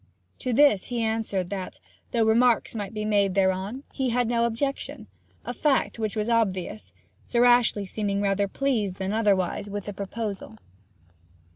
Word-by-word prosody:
To 255 - -2
this 245 -6 +4
he 240 -2 -2
answered 220 -5 -1
that, 190 -2 -5 0.3
though 230 -2 +1
remarks 235 +1 +3
might 205 -3 -4
be 215 -1 -4
made 200 -3 +2
thereon, 195 +6 0
he 265 -2 -1
had 245 0 +1
no 235 0 +2
objection; 275 +4 -3 0.4
a - - -3
fact 275 -5 +1
which 215 -1 -2
was 215 0 -1
obvious, 185 - -1 0.4
Sir 240 0 +3
Ashley 240 -4 +4
seeming 200 +1 -2
rather 200 0 +1
pleased 215 -5 -1
than 190 +1 -3
otherwise 205 -2 +1
with 205 0 -4
the 205 - -6
proposal. 200 - -5
215 Hz, 155 wpm, -26 LUFS, 195-235 Hz, 0.4 s, this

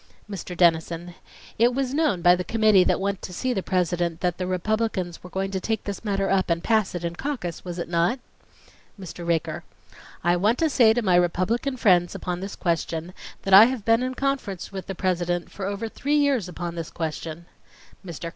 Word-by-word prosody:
MR. 185 -3 -7
DENNISON: 170 0 +2 0.5
It 240 +2 +4
was 265 -1 -1
known 290 - +1
by 175 0 +7
the 180 - -3
committee 215 0 +4
that - - +1
went 200 0 -2
to - - -7
see 250 +8 -1
the 195 - -1
President 175 -2 -1
that 180 -1 -1
the 180 - -2
Republicans 185 -1 -1
were 180 - -10
going 195 +1 -3
to 190 - -2
take 220 +2 -2
this 200 +1 -5
matter 195 -2 0
up 190 -1 +1
and 170 0 0
pass 220 -5 +1
it 175 -1 -3
in 170 0 -3
caucus, 235 - -4
was 175 -1 -6
it 170 - -4
not?' 175 +9 +1 0.8
MR. 175 -2 -8
RAKER: 165 -2 -1 0.6
I 175 +1 +3
want 210 +7 +2
to 320 -2 +1
say 235 -4 +5
to 240 0 -1
my 185 -3 +3
Republican 185 +10 +1
friends 180 -6 +3
upon 180 -1 -4
this 195 +2 -6
question 165 0 -2 0.3
that 195 - 0
I 200 +3 +11
have 245 -3 -3
been 230 +1 +4
in 255 0 -2
conference 265 -11 -2
with 190 -1 -7
the 195 - -4
President 175 -2 -1
for 195 -1 -5
over 205 +3 -3
three 285 +6 -1
years 275 -10 +1
upon 175 -1 -5
this 165 -2 -5
question.... 160 0 -5 0.6
MR. 170 -2 -6
185 Hz, 205 wpm, -24 LUFS, 175-220 Hz, 0.8 s, I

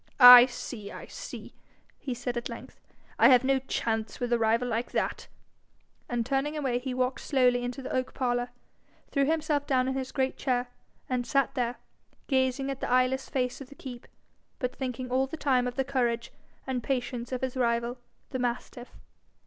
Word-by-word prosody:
'I 245 -1 +12
see, 225 -4 -7
I - - -8
see!' - - -9 0.5
he 255 -3 -4
said 245 0 -4
at 240 - -3
length, - - -10 0.4
'I - - +8
have 250 -1 +6
no 270 0 +2
chance 225 -4 -2
with 245 -1 -1
a 235 - +2
rival 230 +2 +2
like 235 0 -2
that!' - - -2 0.8
and 240 -1 -1
turning 275 +3 -1
away 260 -5 0
he 260 +1 -4
walked 255 +1 -1
slowly 250 -3 +2
into 245 +2 -4
the 265 - -5
oak 255 0 -2
parlour, 245 -1 0 0.6
threw 280 -1 +2
himself 300 -1 0
down 255 -2 +2
in 265 - 0
his 265 -1 -4
great 265 -1 -1
chair, 250 -2 -1 0.4
and 250 -1 -2
sat 275 -2 +1
there, 245 -2 -1 0.5
gazing 265 0 +1
at 270 - -6
the - - -3
eyeless 255 +1 +2
face 250 0 -2
of 265 - -9
the 280 - -13
keep, 250 -3 -9 0.5
but 250 -1 -3
thinking 255 -1 -4
all 260 +1 +2
the 320 - -7
time 255 -4 +2
of 245 - -4
the 270 - 0
courage 240 -3 -1 0.3
and 260 -2 -2
patience 245 -2 -3
of 255 - -3
his 260 -1 -2
rival, 235 0 0 0.3
the 260 - -3
mastiff. 245 0 -4
255 Hz, 185 wpm, -28 LUFS, 245-265 Hz, 0.8 s, I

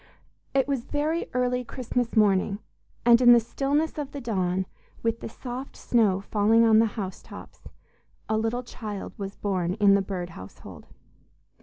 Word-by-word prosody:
It 270 0 +3
was 275 -4 -2
very 310 +3 -1
early 250 0 +1
Christmas 245 -1 -3
morning, 200 -1 +3 0.5
and 235 0 +6
in 240 -1 +8
the 240 - +7
stillness 285 +7 -1
of 285 -2 -5
the 285 - -5
dawn, 190 -6 -1 0.4
with 230 0 0
the - - -6
soft 250 +3 -7
snow 210 -6 +2
falling 220 +3 +3
on 220 -1 +6
the 225 - +4
housetops, 190 -3 -8 0.6
a 220 - 0
little 225 +3 -1
child 215 -5 -7
was 195 0 -5
born 185 -3 -1
in 205 -2 +5
the 200 - +4
Bird 185 -2 -4
household. 95 - -12
225 Hz, 155 wpm, -26 LUFS, 200-250 Hz, 0.6 s, in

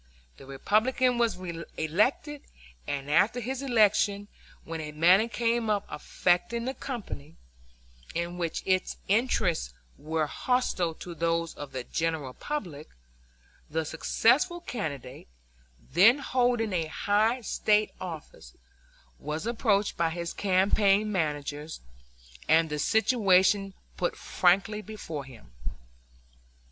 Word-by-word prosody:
The 135 - -14
Republican 235 - +1
was 230 -5 +2 0.4
elected, 230 - 0 0.5
and 140 -1 -3
after 190 +11 +3
his 255 +3 -4
election, 210 -5 +2 0.3
when 165 -1 -5
a 150 -1 -6
matter 180 +8 +5
came 235 -1 0
up 205 -1 +1
affecting 210 +7 0
the 260 - -2
company, 210 - -7 0.8
in 170 +1 -3
which 165 -2 -2
its 185 -1 0
interests 185 - +1 0.2
were 155 +1 -1
hostile 180 - 0
to 175 - -8
those 165 0 -1
of 145 -2 -8
the 130 -2 -4
general 160 -3 -2
public, 175 - -5 0.8
the 160 +1 -1
successful 260 - +2
candidate, 145 - -6 0.5
then 195 - +5
holding 245 -5 0
a 165 -3 0
high 215 +9 +1
State 210 -1 +1
office, 160 - -8 0.6
was 155 +5 -4
approached 215 -3 +1
by 170 -1 +2
his 170 0 -4
campaign 200 +2 +2
managers 150 -3 -3 0.7
and 160 -1 +4
the 150 - -2
situation 195 - +3 0.2
put 175 - -1
frankly 195 +4 +1
before 165 -10 -7
him. 115 - -15
185 Hz, 110 wpm, -28 LUFS, 160-225 Hz, 0.8 s, matter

